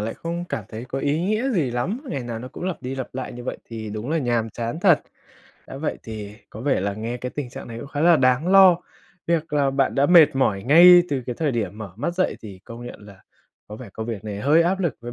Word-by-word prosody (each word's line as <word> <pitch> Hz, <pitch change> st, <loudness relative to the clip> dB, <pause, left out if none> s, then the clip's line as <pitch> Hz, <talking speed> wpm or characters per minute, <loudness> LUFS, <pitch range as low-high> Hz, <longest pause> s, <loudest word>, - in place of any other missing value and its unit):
lại 110 Hz, +2 st, -3 dB
không 170 Hz, +1 st, -5 dB
cảm 110 Hz, -, -4 dB
thấy 110 Hz, +3 st, -7 dB
có 130 Hz, +2 st, -5 dB
ý 145 Hz, +3 st, 0 dB
nghĩa 215 Hz, +8 st, 0 dB
gì 165 Hz, -, 0 dB
lắm, 160 Hz, -, -2 dB
ngày 135 Hz, -, -3 dB
nào 120 Hz, -2 st, -5 dB
nó 125 Hz, +3 st, -8 dB
cũng 175 Hz, -, -8 dB
lặp 185 Hz, -6 st, -4 dB
đi 130 Hz, +1 st, -4 dB
lặp 130 Hz, -1 st, -5 dB
lại 130 Hz, 0 st, -5 dB
như 120 Hz, 0 st, -9 dB
vậy -, -, -4 dB
thì 110 Hz, -2 st, -7 dB
đúng 110 Hz, +6 st, -5 dB
là 165 Hz, -, +1 dB
nhàm 120 Hz, -4 st, -1 dB
chán 120 Hz, +7 st, -4 dB
thật. 175 Hz, -5 st, +5 dB, 0.7 s
Đã -, -, -9 dB
vậy 150 Hz, +3 st, -3 dB
thì 105 Hz, -2 st, -8 dB, 0.2 s
có 110 Hz, -, -9 dB
vẻ 135 Hz, -2 st, +1 dB
là 100 Hz, +1 st, -1 dB
nghe 115 Hz, +3 st, -4 dB
cái 125 Hz, +1 st, -5 dB
tình 140 Hz, -3 st, -5 dB
trạng 120 Hz, -, -9 dB
này 115 Hz, 0 st, -7 dB
cũng 140 Hz, -, -8 dB
khá 145 Hz, 0 st, -4 dB
là 170 Hz, +1 st, +6 dB
đáng 130 Hz, +4 st, +2 dB
lo, 190 Hz, -2 st, +7 dB, 0.5 s
việc 165 Hz, -1 st, -1 dB
là 140 Hz, -2 st, +2 dB
bạn 135 Hz, 0 st, 0 dB
đã 140 Hz, +1 st, +3 dB
mệt 170 Hz, -6 st, +6 dB
mỏi 100 Hz, -7 st, +1 dB
ngay 175 Hz, +6 st, +8 dB
từ 135 Hz, -3 st, -2 dB
cái 125 Hz, -, -3 dB
thời 155 Hz, -3 st, +1 dB
điểm 110 Hz, -2 st, -3 dB
mở 105 Hz, -4 st, -8 dB
mắt 150 Hz, +9 st, -3 dB
dậy 185 Hz, +1 st, 0 dB
thì 100 Hz, -4 st, -10 dB
công 120 Hz, +1 st, -9 dB
nhận -, -, -10 dB
là 100 Hz, -2 st, -15 dB, 0.5 s
có 105 Hz, -, -8 dB
vẻ 120 Hz, -1 st, -10 dB
công 110 Hz, +2 st, -6 dB
việc 110 Hz, -3 st, -5 dB
này 105 Hz, -1 st, -5 dB
hơi 155 Hz, +6 st, +4 dB
áp 190 Hz, +3 st, 0 dB
lực 170 Hz, -9 st, -1 dB
với 120 Hz, 0 st, -7 dB
130 Hz, 270 wpm, -23 LUFS, 115-165 Hz, 0.7 s, ngay